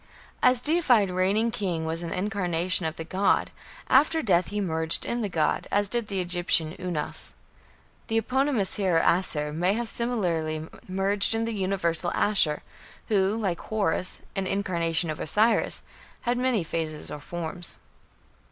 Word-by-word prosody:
A 255 0 +5
deified 250 - +3
reigning 195 +5 +1
king 180 -7 -2
was 165 +1 -3
an 170 - -5
incarnation 180 -3 +1
of 160 - -5
the 165 - -6
god; 190 +4 +1 0.4
after 310 +4 +4
death 180 -4 +3
he 210 +2 -3
merged 160 -4 +1
in 240 0 -2
the 210 - -2
god, 160 -4 0
as 205 0 +2
did 235 +1 -2
the 195 -2 -2
Egyptian 175 -2 +1
Unas. 175 -5 -2 0.7
The 225 - 0
eponymous 255 -3 0
hero 185 -5 +2
Asshur 150 -4 +1
may 175 +5 +1
have 235 +2 -2
similarly 170 -11 -1 0.2
merged 195 +3 +3
in 225 0 0
the 230 - -3
universal 185 -4 0
Ashur, 170 -8 +2 0.5
who, 200 0 +2
like 190 -6 -1
Horus, 195 -4 -1
an 195 -1 -1
incarnation 170 -4 0
of 155 - -6
Osiris, 220 +8 +1 0.4
had 240 0 0
many 250 -7 +1
phases 160 -2 -4
or 150 - -6
forms. 175 +2 -2
190 Hz, 150 wpm, -26 LUFS, 165-215 Hz, 0.7 s, A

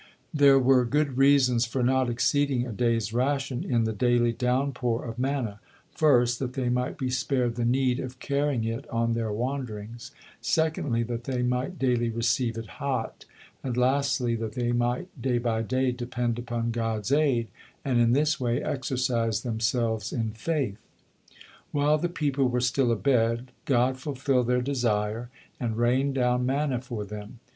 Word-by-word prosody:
'" - - -39
There 140 -2 +6
were 130 -1 +4
good 140 +2 0
reasons 130 -4 +4
for 125 +2 -1
not 130 0 +2
exceeding 130 +1 +1
a 120 - -5
day's 115 -1 0
ration 135 +1 0
in 120 -3 +1
the 110 0 -1
daily 120 +2 +2
downpour 125 -1 -1
of 115 0 -6
manna. 130 -6 -2 0.3
First, 125 -5 +3
that 130 -2 -3
they 125 -2 -1
might 125 +1 -1
be 130 -3 -2
spared 125 -2 0
the 120 0 -2
need 125 +1 +2
of 130 -1 -6
carrying 140 -3 0
it 115 +5 -4
on 115 0 0
their 115 -2 -1
wanderings; 115 -2 -4 0.3
secondly, 155 -7 0
that 120 0 -5
they 125 -2 -1
might 125 +8 -1
daily 120 -3 +1
receive 115 +1 0
it 115 - -5 0.2
hot; 130 -5 -3 0.4
and, 125 -2 -3
lastly, 130 -1 +2
that 110 -1 -4
they 120 0 -1
might 120 +7 0
day 125 -1 +1
by 115 -2 0
day 130 +3 0
depend 120 -1 -2
upon 120 -1 -2
God's 115 0 -2
aid, 135 -6 +2 0.4
and 130 -3 +2
in 120 0 +4
this 150 +3 +2
way 120 -1 0
exercise 120 -4 -1
themselves 110 -2 -1
in 115 -2 -2
faith. 120 -2 -2 0.9
While 145 +1 +2
the 175 - -1
people 145 -6 0
were 125 0 0
still 125 0 +2
abed, 115 0 +1
God 130 0 +2
fulfilled 130 -2 0
their 125 0 +2
desire, 115 -3 -1 0.3
and 115 -3 -2
rained 130 +4 +2
down 125 -1 +2
manna 135 -1 0
for 120 -5 -5
them. 105 +3 -9
125 Hz, 165 wpm, -27 LUFS, 115-135 Hz, 0.9 s, There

